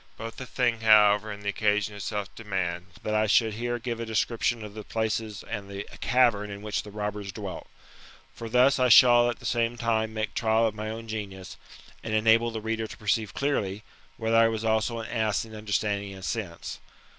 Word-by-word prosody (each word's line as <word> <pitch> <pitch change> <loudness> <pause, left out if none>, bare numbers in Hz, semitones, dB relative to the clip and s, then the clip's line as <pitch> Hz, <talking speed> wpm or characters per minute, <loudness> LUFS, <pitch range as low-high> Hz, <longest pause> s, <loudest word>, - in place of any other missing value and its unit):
Both 115 0 -7
the 130 - -7
thing, 120 -2 0
however, 105 -1 +5
and 100 0 -8
the 100 - -1
occasion 105 0 +1
itself 100 0 -4
demand, 90 -5 -3 0.2
that 110 - -2
I 110 0 +2
should 110 +1 +3
here 120 +2 -2
give 120 -1 -4
a - - -2
description 115 +1 0
of 105 - -10
the 110 0 -7
places 110 -1 -2
and 100 -3 -5
the 100 0 -5 0.2
cavern 120 -5 +2
in 100 0 -8
which 105 -1 -2
the 105 - -11
robbers 105 -1 -4
dwelt - - -7 0.7
For 115 - -7
thus 125 +3 +4
I 125 0 +3
shall 120 +1 +7
at 120 - -3
the - - -14
same 120 0 0
time 110 -2 0
make 110 0 -3
trial 110 0 +2
of 110 - 0
my 110 0 -5
own 115 +1 -6
genius, 100 -4 -6 0.5
and 110 -1 -2
enable 115 +2 +4
the 110 -1 -5
reader 110 0 -2
to - - -10
perceive 105 -1 -1
clearly, 105 -8 -1 0.3
whether 115 0 +1
I 115 0 +6
was 110 0 -2
also 110 +1 +1
an 110 - -7
ass 110 -3 0
in 110 - -13
understanding 105 -2 -2
and 95 -1 -8
sense. 95 -8 -4
110 Hz, 205 wpm, -27 LUFS, 105-115 Hz, 0.7 s, shall